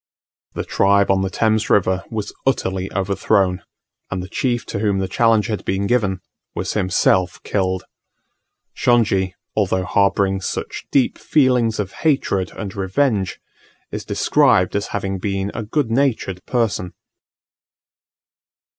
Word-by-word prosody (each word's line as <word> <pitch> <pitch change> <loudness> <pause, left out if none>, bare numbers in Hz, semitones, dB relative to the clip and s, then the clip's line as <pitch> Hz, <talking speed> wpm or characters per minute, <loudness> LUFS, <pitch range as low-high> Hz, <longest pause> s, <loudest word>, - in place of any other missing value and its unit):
The - - -2
tribe 100 0 +3
on 95 0 +2
the 95 - -1
Thames 110 +2 +1
River 95 -1 +2
was 105 -2 -4
utterly 95 -7 0
overthrown, 95 -1 +1 0.5
and 95 -1 -3
the - - -7
chief 120 +1 -1
to - - -4
whom 100 -2 +1
the 95 -1 -1
challenge 110 +2 +3
had 110 -3 -3
been 95 +1 -1
given 100 -5 +1 0.3
was - - -2
himself 90 -1 +2
killed. 95 -2 -1 0.9
Shongi, 100 -6 +2 0.2
although 95 -3 +1
harbouring 100 0 +1
such - - -4
deep 135 -3 +2
feelings 125 -6 +2
of 100 -2 -2
hatred 115 - +1
and 100 +1 -6
revenge, 100 0 0 0.5
is - - -4
described 90 +1 +2
as 100 0 -1
having 95 -1 -3
been 100 +1 -2
a - - -4
good 115 +3 -1
natured 115 -8 0
person. 110 -7 -1
100 Hz, 130 wpm, -20 LUFS, 95-110 Hz, 0.9 s, tribe